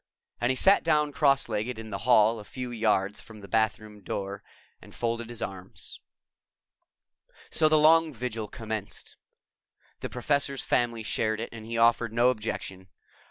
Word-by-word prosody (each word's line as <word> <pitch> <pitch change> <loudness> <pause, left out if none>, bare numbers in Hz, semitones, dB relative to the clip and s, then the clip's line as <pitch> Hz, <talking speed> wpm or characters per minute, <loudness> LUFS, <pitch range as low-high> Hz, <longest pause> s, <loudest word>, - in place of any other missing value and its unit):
And 120 - +1
he 130 - +2
sat 195 +10 +5
down 150 -2 +2
cross 140 -2 +2
legged 110 +2 -3
in 110 -1 -8
the 100 - -4
hall 110 -1 +5
a - - -9
few 125 +3 -6
yards 105 -3 0
from 110 -2 -13
the 100 - -10
bathroom 110 -1 -1
door 100 +1 -5 0.4
and - - -15
folded 115 0 -2
his 120 -1 -5
arms. 95 -1 -8 1.5
So 155 -1 +3
the 155 - +4
long 160 +1 +5
vigil 115 -4 -4
commenced. 110 -2 -6 0.8
The - - -5
Professor's 140 +2 -1
family 120 -2 0
shared 110 0 -1
it 115 - -4
and 110 -1 -10
he 115 0 -3
offered 115 0 +3
no 120 +2 +4
objection. 100 -5 -5
115 Hz, 160 wpm, -27 LUFS, 110-125 Hz, 1.5 s, sat